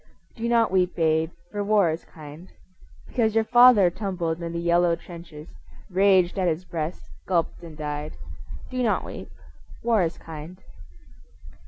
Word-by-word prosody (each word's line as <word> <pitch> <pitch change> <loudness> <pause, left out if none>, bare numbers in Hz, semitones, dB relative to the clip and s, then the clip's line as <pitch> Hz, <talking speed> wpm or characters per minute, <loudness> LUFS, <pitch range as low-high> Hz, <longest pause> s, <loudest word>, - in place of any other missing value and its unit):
Do 235 0 -3
not 230 -3 +3
weep, 185 -1 +1
babe, 160 -1 +2 0.2
for 205 -1 -2
war 200 -5 +3
is 160 - -6
kind. 155 +3 -12 0.6
Because 225 -3 0
your 225 - +4
father 240 -5 +6
tumbled 175 -4 -3
in 170 0 -4
the 170 - -4
yellow 170 0 +3
trenches, 165 -2 -11 0.4
Raged 190 0 +3
at 185 - +1
his 170 +2 -1
breast, 165 -1 -4 0.2
gulped 175 -3 0
and 165 -3 -11
died, 150 0 -4 0.6
Do 255 0 -2
not 230 -3 +1
weep. - - -8 0.5
War 230 -3 +3
is 170 -1 -1
kind. 160 +2 -9
175 Hz, 150 wpm, -25 LUFS, 160-205 Hz, 0.6 s, father